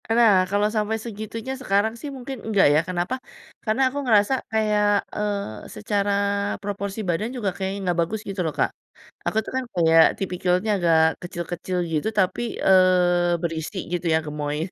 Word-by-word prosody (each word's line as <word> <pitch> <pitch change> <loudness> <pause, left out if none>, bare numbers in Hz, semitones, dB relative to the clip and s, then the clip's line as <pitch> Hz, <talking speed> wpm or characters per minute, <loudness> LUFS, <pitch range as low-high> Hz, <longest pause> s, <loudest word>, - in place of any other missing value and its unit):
E - - -2
nah, 230 -3 +6 0.2
kalau 205 +1 +2
sampai 215 +1 0
segitunya 225 +3 -6
sekarang 205 -1 +1
sih 290 - -6
mungkin 265 +1 -6
enggak 210 -3 +3
ya, 150 - +5
kenapa? 180 +6 -1 0.5
Karena 220 +3 0
aku 285 +2 -4
ngerasa 215 0 +4 0.2
kayak, 215 -1 +2 0.3
eee, 200 - -3
secara 200 - -1 0.5
proporsi 200 0 -4
badan 200 +7 0
juga 210 -5 0
kayaknya 195 +2 -3
enggak 175 -1 0
bagus 205 +6 -2
gitu 195 -1 -3
loh, 155 - -2
Kak. - - +1 0.6
Aku - - -4
tuh - - -7
kan 260 - -1
kayak 165 -1 +6
tipikalnya 185 +2 0
agak 170 -3 +3 0.3
kecil-kecil 175 +1 -4 0.2
gitu, 155 +5 0
tapi, 185 +3 +1 0.3
eee, 180 -2 +4
berisi 165 +2 -4 0.2
gitu 175 0 -2
ya, - - +5
gemoy. 150 0 -3
195 Hz, 165 wpm, -23 LUFS, 175-215 Hz, 0.6 s, nah